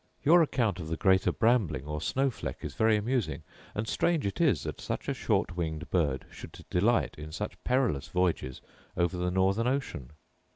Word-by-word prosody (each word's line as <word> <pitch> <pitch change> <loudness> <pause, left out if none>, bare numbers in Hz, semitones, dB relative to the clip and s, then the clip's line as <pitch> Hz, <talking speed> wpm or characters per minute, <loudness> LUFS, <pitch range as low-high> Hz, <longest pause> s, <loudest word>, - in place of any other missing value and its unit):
Your 170 +4 +7
account 115 - +1
of 80 - -6
the 80 0 -3
greater 95 -1 +3
brambling, 100 - +1
or 75 0 -4
snow 135 +9 +1
fleck, - - -6
is - - -5
very 110 -1 +3
amusing; 120 +1 -1 0.3
and 105 +2 -2
strange 165 0 +1
it 100 - -2
is - - +3
that - - -5
such - - -4
a - - +1
short 90 - 0
winged 80 -2 -4
bird 75 -7 +1
should - - -11
delight 110 +7 +2
in 75 +1 -7
such - - -6
perilous 125 - +1
voyages 90 -8 -1 0.4
over 85 +1 +1
the 90 0 -1
northern 95 +5 +2
ocean! 125 - -3
95 Hz, 180 wpm, -29 LUFS, 80-120 Hz, 0.4 s, Your